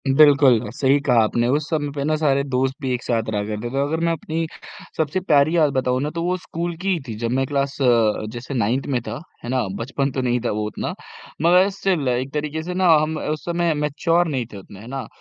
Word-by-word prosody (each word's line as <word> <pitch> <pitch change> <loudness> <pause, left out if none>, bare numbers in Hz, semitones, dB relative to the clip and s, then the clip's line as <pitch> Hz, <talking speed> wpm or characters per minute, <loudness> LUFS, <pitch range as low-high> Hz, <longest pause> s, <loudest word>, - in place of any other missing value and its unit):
बिल्कुल 135 -4 +5
सही 140 +1 +3
कहा 120 -4 +4
आपने, 120 +2 +1
उस 145 +4 0
समय 150 -2 -1
पे 140 - -2
ना 155 +2 +1
सारे 140 -3 +2
दोस्त 130 -1 -1
भी 130 -2 -1
एक 125 - -3
साथ 115 -2 -1
रहा 105 -1 0
करते 110 +2 -4
थे। 135 - +1
अगर 150 +3 -1
मैं 170 - +2
अपनी 165 0 -3 0.5
सबसे 160 +3 0
प्यारी 155 -3 +3
याद 150 -4 +3
बताऊँ 130 -1 0
ना 145 - -1
तो 165 - -2
वो 180 +1 0
स्कूल 170 -1 -4
की 195 - -1
ही 175 - -1
थी 115 - -5
जब 115 - 0
मैं 135 - +1
क्लास 140 0 -1
अ, 115 -4 +3
जैसे 120 +4 -7
9th 125 +2 0
में - - -3
था 120 +6 -5 0.2
है 120 - -6
ना, 130 0 +1 0.2
बचपन 135 +2 -1
तो 130 - -2
नहीं 125 -1 +1
था - - +1
वो 105 0 -2
उतना 105 - -4 0.5
मगर 180 +4 +5
स्टिल 185 -8 0
एक 125 +2 -1
तरीके 150 +1 -3
से 180 +2 -4
ना 185 0 +2
हम 155 +1 -1
उस 155 0 -3
समय 170 -1 +1
मैच्योर 150 +4 +1
नहीं 130 -6 -2
थे - - -7
उतने 95 0 -12
है 110 - -11
ना, 135 +1 -5
140 Hz, 240 wpm, -22 LUFS, 125-160 Hz, 0.5 s, बिल्कुल